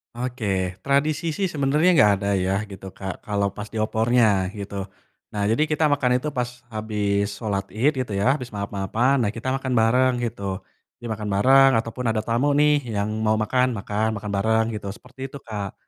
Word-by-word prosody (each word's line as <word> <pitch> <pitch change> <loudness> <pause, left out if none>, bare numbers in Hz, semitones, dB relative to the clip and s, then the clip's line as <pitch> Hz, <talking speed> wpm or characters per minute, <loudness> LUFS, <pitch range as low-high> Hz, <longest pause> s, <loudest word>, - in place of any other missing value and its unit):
Oke, 125 -1 -4 0.4
tradisi 150 +3 +1
sih 190 +2 -1
sebenernya 150 +3 +2
nggak 105 -5 +6
ada 100 - -2 0.2
ya 95 - +1 0.2
gitu 95 -1 -10
Kak 95 +2 -7
kalau 100 -2 0
pas 105 +1 -7
di 110 - -1
opornya 110 -3 +2
gitu, 100 0 -6 0.6
nah 105 - -2
jadi 150 +7 +2
kita 155 0 +1
makan 140 -3 +2
itu 150 - -2
pas 120 0 0 0.2
habis 105 -2 -1
sholat 100 -2 -3
ied 135 +8 +2
gitu 125 -5 -2
ya 115 - +3
habis 125 -4 -9
maaf-maafan 105 +6 0
nah 105 - 0
kita 115 +3 -4
makan 130 -1 -3
bareng 125 +3 +3
gitu, 100 -5 -3 0.4
dimakan 110 -3 -4
bareng 135 +6 +6
ataupun 120 +2 -6
ada 110 - 0
tamu 120 +6 +1
nih 145 -1 +3
yang 100 +1 -1 0.2
mau 110 - +3
makan, 125 +3 +1
makan, 110 +1 -1
makan 105 -1 -5
bareng 110 +2 +2
gitu 105 - -10
seperti 130 +3 -10
itu 140 - -5
Kak, 105 -4 -5
115 Hz, 180 wpm, -23 LUFS, 105-130 Hz, 0.6 s, nggak